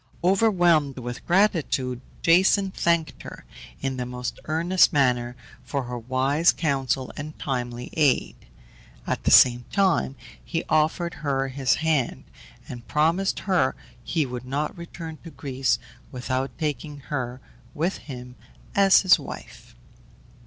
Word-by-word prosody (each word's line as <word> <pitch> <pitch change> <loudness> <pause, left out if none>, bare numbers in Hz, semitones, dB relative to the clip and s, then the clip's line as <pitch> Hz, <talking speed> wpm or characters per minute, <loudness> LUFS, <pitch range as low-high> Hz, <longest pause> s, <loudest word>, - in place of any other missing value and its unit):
Overwhelmed 175 - +3
with 120 -1 -6
gratitude, 160 - +1 0.2
Jason 190 +3 +4
thanked 170 -3 0
her, - - -10 0.4
in 135 -1 -2
the 125 - -3
most 125 0 -5
earnest 170 +4 +3
manner, 125 -4 +1 0.3
for 130 +2 -3
her 125 0 -5
wise 135 +7 +2
counsel 135 -4 -1
and 150 +2 -7
timely 125 -2 -4
aid; 145 -5 +2 0.7
at - - -3
the - - +4
same 120 -1 +6
time 185 -8 +2 0.3
he 165 -1 -3
offered 160 +2 +1
her 135 -2 0
his 135 0 +1
hand, 155 -6 0 0.4
and 120 -1 -9
promised 165 +6 +1
her 180 -9 +1 0.3
he 160 -4 0
would 125 -1 -6
not 145 +3 -2
return 165 -2 -8
to 165 - -9
Greece 135 -4 -1 0.3
without 130 +1 -2
taking 150 -2 -4
her 125 -2 -3 0.4
with 170 +5 -1
him 125 -3 -9 0.4
as 195 -1 +6
his 185 - +5
wife. - - -10
145 Hz, 130 wpm, -25 LUFS, 130-170 Hz, 0.7 s, same